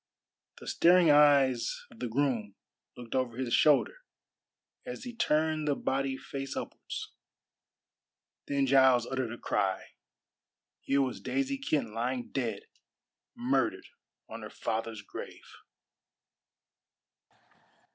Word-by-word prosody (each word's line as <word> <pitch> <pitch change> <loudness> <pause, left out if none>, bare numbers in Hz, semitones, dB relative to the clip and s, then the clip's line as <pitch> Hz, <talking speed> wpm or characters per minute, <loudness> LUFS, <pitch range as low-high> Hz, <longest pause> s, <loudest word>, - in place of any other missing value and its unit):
The - - -12
staring 175 -2 +5
eyes 140 -4 +4
of 115 - -16
the 125 - -2
groom 115 -5 -1 0.4
looked 120 -2 -8
over 125 -3 -1
his 130 -3 -2
shoulder 150 - +4 0.9
as 245 -1 -7
he 245 -2 -7
turned 155 -6 +1
the 145 - +2
body 135 0 -1
face 135 0 -6
upwards. - - -6 1.4
Then 140 -1 +1
Giles 130 -2 +5
uttered 130 -3 -3
a 120 - -6
cry. 95 -4 -1 0.9
Here 140 0 +1
was 130 - -4
Daisy 275 0 -1
Kent 150 - -1
lying 120 +2 -2
dead 115 -7 -3 0.7
murdered - - 0 0.4
on - - -8
her - - -7
father's 110 -1 -4
grave! - - -9
135 Hz, 110 wpm, -30 LUFS, 120-150 Hz, 1.4 s, staring